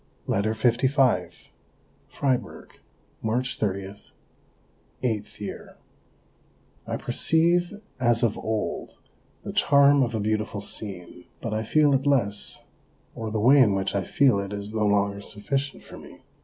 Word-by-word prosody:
LETTER 110 +3 0
LV 120 - +1 0.6
Fribourg, 125 -7 -3 0.4
March 125 +4 -1
30 100 -1 -3 1.1
(VIII). 105 -3 -3 1.3
I - - -2
perceive 175 +4 +1 0.2
as 120 -2 +2
of 115 -3 +2
old 110 -1 -3 0.5
the - - -6
charm 140 0 +5
of 120 -3 0
a - - -1
beautiful 105 0 -1
scene, 95 -4 -6
but 115 - -4
I 110 - -1
feel 145 +5 +3
it 135 +1 +1
less, 105 -8 0 0.5
or 110 -1 -5
the 110 0 -2
way 130 +7 +6
in 105 -7 +5
which 95 0 -1
I 100 - 0
feel 125 +2 +3
it 100 0 -5
is 100 +1 -6
no 110 -1 +1
longer 100 0 +1
sufficient 135 +8 -3
for - - -11
me. - - -14
110 Hz, 130 wpm, -25 LUFS, 100-135 Hz, 1.3 s, way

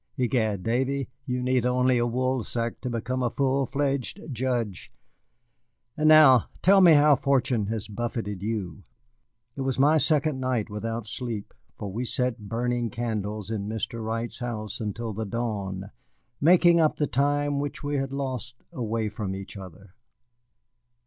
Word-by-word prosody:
Egad, 115 -6 0
Davy, 130 +3 0 0.2
you 125 -1 -1
need 125 -1 +2
only 125 0 +2
a 120 - +1
woolsack 120 -1 -2
to 125 - -3
become 120 +2 -2
a 120 - +1
full 135 +1 +1
fledged 140 - -1
judge. 120 -6 -2 1.0
And 155 0 +3
now 150 -6 +7
tell 195 +1 +6
me 175 -3 +8
how 150 0 +6
fortune 130 -6 +1
has 110 -1 -3
buffeted 105 -2 -4
you." 105 -2 -3 0.7
It 135 - -5
was 130 -2 -1
my 150 +4 +5
second 150 -2 +1
night 125 -5 -1
without 115 +2 -4
sleep, 115 -2 -5 0.2
for 100 - -5
we 115 +6 -3
sat 125 -4 -2
burning 120 0 -1
candles 105 -2 -3
in 105 -2 -3
Mr. 110 +1 -4
Wright's 115 +1 -3
house 110 -3 -5
until 110 +1 -3
the 110 +2 -3
dawn, 100 -3 -4 0.5
making 170 +2 +6
up 155 -2 +3
the 150 - 0
time 145 +1 +1
which 145 0 -4
we 145 0 -1
had 135 0 -2
lost 130 -3 -4 0.2
away 115 -2 -2
from 105 -2 -4
each 95 +1 -8
other. 95 0 -11
120 Hz, 150 wpm, -26 LUFS, 110-135 Hz, 1.0 s, me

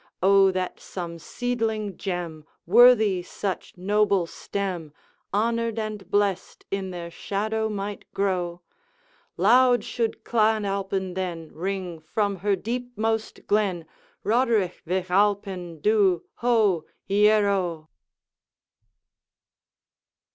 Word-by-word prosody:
O 195 0 +6
that 185 -1 -3
some 170 -2 -6
seedling 220 -3 -2
gem, 175 -5 -4 0.2
Worthy 220 -2 +6
such 185 +1 -5
noble 200 0 +2
stem, 175 -4 -4 0.4
Honored 230 +2 0
and 215 -4 -4
blessed 205 -2 0
in 195 -1 -2
their 170 -2 -6
shadow 220 +4 -2
might 205 -1 -5
grow! 180 -3 -1 0.8
Loud 245 +6 +5
should 230 -2 -2
Clan 220 -2 +2
Alpine 195 -1 -2
then 175 -4 -4
Ring 180 -1 -4
from 200 +5 -1
her 200 +2 +1
deepmost 225 0 -3
glen, 195 -5 +1 0.4
Roderigh 225 -5 +2
Vich 185 +1 -1
Alpine 190 -4 0
dhu, 195 -2 +3
ho! 220 -9 +2 0.2
ieroe!' 200 -5 +2
200 Hz, 95 wpm, -25 LUFS, 180-215 Hz, 0.8 s, O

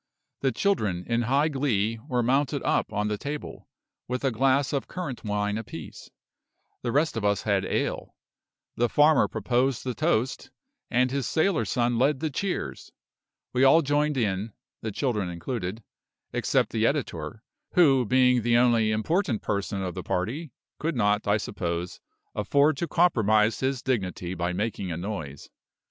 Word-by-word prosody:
The 135 - +1
children, 110 - 0
in 115 0 0
high 135 +6 +2
glee, 115 -6 0
were 125 -4 0
mounted 140 +3 +1
up - - +1
on 105 0 -1
the 105 -1 -2
table, 145 +3 -6 0.4
with 125 +2 -3
a 135 - +2
glass 135 +4 +2
of 140 - -1
currant 170 -9 -5
wine 105 0 -1
apiece; 80 -8 -9 0.7
the 120 - -2
rest 150 +5 +1
of 115 - -3
us 100 -1 +1
had 100 -2 +1
ale; - - -2 0.6
the 120 0 +1
farmer 150 +2 +5
proposed 120 +4 0
the 125 - -2
toast, 130 -4 0 0.4
and 125 +1 +2
his 135 -3 -1
sailor 165 +2 +1
son 120 -1 0
led 135 +1 +2
the 155 0 -2
cheers. 195 +6 -3 0.6
We 130 +1 +3
all 160 +5 +6
joined 145 +1 +1
in 105 -2 -1 0.3
(the 110 - -3
children 105 -6 -1
included), 95 +3 -4 0.5
except - - +1
the - - +2
editor - - -3 0.3
who, 140 -7 +5
being 125 +1 +4
the 120 +1 +3
only 120 -3 +4
important 120 - 0
person 100 -1 -2
of 90 -2 -3
the 95 - -5
party, 125 - -3 0.3
could 165 0 -1
not, 105 -2 +1
I 105 +1 +4
suppose, 90 -4 -4 0.3
afford 140 +8 +2
to 170 - -2
compromise 110 - +3
his 130 -1 -1
dignity 95 -8 -2
by 85 0 -2
making 100 -1 -3
a 80 - -3
noise. 85 -7 -6
120 Hz, 155 wpm, -26 LUFS, 105-140 Hz, 0.7 s, all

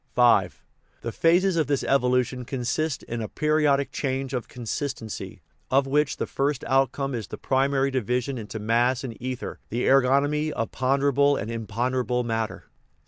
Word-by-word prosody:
V. 120 -6 +5 0.5
The 115 - -4
phases 175 +6 +3
of 155 - +2
this 140 -2 0
evolution 125 -1 +1
consist 135 +4 -2
in 115 0 -4
a 110 - -3
peri 155 +3 +1
odic 140 -1 +2
change 135 -1 -2
of 125 -2 -3
consistency, 120 -1 -5 0.3
of 135 +1 +3
which 145 +1 +1
the - - -1
first 140 -1 -1
outcome 135 +1 +1
is 115 -4 -4
the - - -7
primary 135 0 +1
division 125 +1 -1
into 110 0 -6
mass 120 +4 +1
and 120 -4 -5
ether 130 0 -5
the 120 +2 -1
er 135 0 +6
gonomy 145 +4 +1
of 115 -4 -3
ponderable 140 +2 +2
and 110 +3 -4
imponderable 125 +3 -1
matter. 115 -2 -2
130 Hz, 160 wpm, -25 LUFS, 120-140 Hz, 0.5 s, er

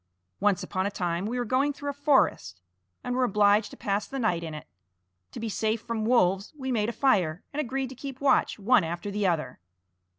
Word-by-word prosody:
Once 200 -2 +2
upon 185 +1 -1
a - - 0
time 175 -1 -2
we 240 +3 -3
were 245 - -1
going 265 +5 +2
through 285 0 -4
a - - -10
forest 275 - +1 0.4
and 250 0 -2
were 255 - +2
obliged 205 -1 +3
to - - -12
pass 200 0 -1
the 270 - -6
night 180 -9 0
in 160 -2 -5
it. 150 - -8 0.7
To - - -6
be 230 - -3
safe 220 +1 -1
from 225 -1 -3
wolves, 200 - +2
we 265 -2 -3
made 220 -2 +1
a - - -1
fire, 185 - +1
and 300 - 0
agreed 265 -1 -3
to - - -8
keep 265 0 -8
watch 280 - +2
one 220 0 +4
after 170 +5 -4
the 205 -1 0
other. 155 - -1
215 Hz, 220 wpm, -27 LUFS, 185-255 Hz, 0.7 s, one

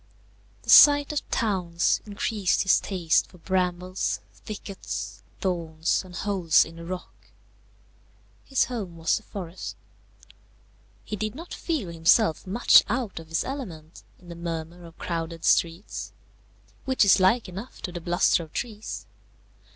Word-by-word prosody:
The - - -11
sight 290 -1 +8
of 295 - -3
towns 180 -7 +1
increased 205 -1 0
his 195 - +4
taste 175 -5 +1
for 180 - -17
brambles, 180 +1 -1
thickets, 205 -2 -7 0.2
thorns, 165 -3 -1
and 180 -1 -12
holes 185 -5 +3
in 165 +1 -12
the 170 - -9
rock. 185 +1 -8 1.2
His 270 - +2
home 200 -9 -6
was 165 0 +1
the - - -8
forest. 185 -4 -7 1.3
He 215 - -4
did 215 +2 -3
not 335 +4 -9
feel 300 - -3
himself 170 +2 +3
much 220 +6 +6
out 235 -6 -2
of 165 - -11
his 165 - 0
element 180 - -7 0.2
in 175 - -17
the 170 - -7
murmur 170 0 -6
of 165 0 -14
crowded 165 -1 -4
streets, 170 +4 0 0.7
which 260 -5 +3
is 195 - +6
like 200 +5 +3
enough 195 +7 -9
to 180 - -3
the 175 -1 -6
bluster 175 0 +2
of 160 -2 -11
trees. 220 -3 -5
185 Hz, 140 wpm, -26 LUFS, 170-215 Hz, 1.3 s, sight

